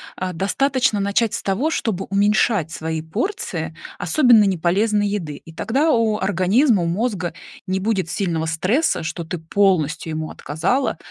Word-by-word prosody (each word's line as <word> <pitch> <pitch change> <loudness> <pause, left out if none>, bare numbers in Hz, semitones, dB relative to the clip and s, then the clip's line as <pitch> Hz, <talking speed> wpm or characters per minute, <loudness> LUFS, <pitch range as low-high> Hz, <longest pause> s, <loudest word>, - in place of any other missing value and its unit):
А, 185 -1 -4
достаточно 250 - +1
начать 200 +3 +1
с - - -5
того, 215 +11 0
чтобы 200 - -2
уменьшать 200 -4 +2
свои 160 0 -3
порции, 235 - -3 0.2
особенно 240 -8 +5
неполезной 200 +4 +1
еды, 170 -8 -3
и 160 - -13
тогда 270 - +1
у 225 -4 +2
организма, 200 - +2
у - - -1
мозга 180 -3 -1 0.3
не 190 +1 0
будет 195 -4 -1
сильного 170 -5 -1
стресса, 190 - +1
что 165 +1 -4
ты 175 +2 -5
полностью 165 -2 +1
ему 155 0 -4
отказала 175 - -1
195 Hz, 145 wpm, -21 LUFS, 170-225 Hz, 0.3 s, особенно